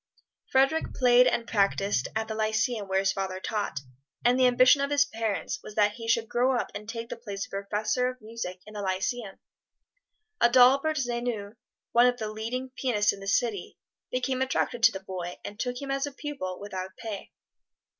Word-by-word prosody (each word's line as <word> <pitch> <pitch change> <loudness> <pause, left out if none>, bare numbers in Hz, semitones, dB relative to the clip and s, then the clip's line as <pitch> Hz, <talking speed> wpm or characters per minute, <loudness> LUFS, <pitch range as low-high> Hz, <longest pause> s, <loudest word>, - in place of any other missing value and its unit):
Frederic 275 +4 +2
played 250 -1 +6
and 235 - +1
practised 200 - +1
at 220 0 -1
the 220 - -3
Lyceum 220 0 0
where 190 0 +2
his 195 0 +2
father 190 -1 -3
taught, 205 -8 -3 0.4
and 245 +2 +4
the 255 - +6
ambition 255 +3 +5
of 280 - 0
his 290 0 +4
parents 225 -2 -3
was 210 - -10
that 210 -1 +4
he 230 +2 -8
should 225 0 +2
grow 250 +3 +2
up - - -3
and 210 +1 -7
take 230 0 -5
the - - -4
place 205 -4 -5
of - - -21
Professor 210 +5 -1
of 255 0 -8
Music 215 -5 -6
in 215 - -12
the 210 - -5
Lyceum. 195 +2 -2 1.0
Adalbert 260 +6 +5
Zevyny, 240 -5 -2 0.4
one 240 +1 +6
of 245 0 +1
the 215 -2 -4
leading 245 +4 -4
pianists 230 -6 +2
in - - -10
the 195 - -9
city, 205 -1 0 0.3
became 255 +1 -1
attracted 260 -2 0
to 230 0 +7
the 190 - -6
boy 180 -2 -5
and 205 +1 -8
took 245 0 -2
him 275 -1 -5
as 275 +1 0
a - - -6
pupil, 275 -11 -5
without 190 -2 -6
pay. 215 -3 -6
230 Hz, 190 wpm, -28 LUFS, 200-250 Hz, 1.0 s, to